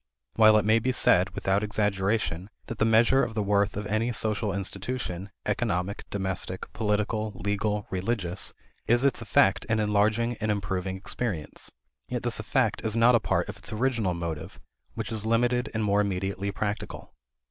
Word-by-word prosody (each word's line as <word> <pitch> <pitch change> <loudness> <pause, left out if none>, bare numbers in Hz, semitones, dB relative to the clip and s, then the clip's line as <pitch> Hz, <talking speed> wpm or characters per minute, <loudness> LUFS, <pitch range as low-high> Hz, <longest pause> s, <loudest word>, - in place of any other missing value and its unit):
While 110 -1 +6
it 105 - +1
may 110 +1 +4
be 130 +3 0
said, 95 -6 +4
without 95 +1 +1
exaggeration, 105 -3 0 0.2
that 115 - -7
the - - +4
measure 115 +4 +5
of 110 - -3
the 105 - 0
worth 100 0 +1
of 105 - -3
any 110 +4 0
social 105 -1 0
institution, 100 0 -4 0.2
economic, 100 -3 -2
domestic, 95 -1 -4
political, 105 0 -1
legal, 105 +2 -1
religious, 95 -1 -2 0.4
is 120 +3 +3
its 140 - +2
effect 100 -3 +3
in 110 -1 0
enlarging 110 +3 +1
and 110 -1 -2
improving 95 -2 -2
experience; 95 -5 -4 0.4
yet - - -3
this - - 0
effect - - 0
is 110 0 -1
not 115 +2 +5
a 115 - +5
part - - 0
of - - -7
its - - -6
original 110 -5 0
motive, 85 -2 -5 0.4
which 110 -1 -4
is 110 -1 -2
limited 120 +2 +2
and 110 -1 -1
more 105 0 +3
immediately 100 0 -2
practical. 105 +1 -4
105 Hz, 165 wpm, -27 LUFS, 95-115 Hz, 0.4 s, While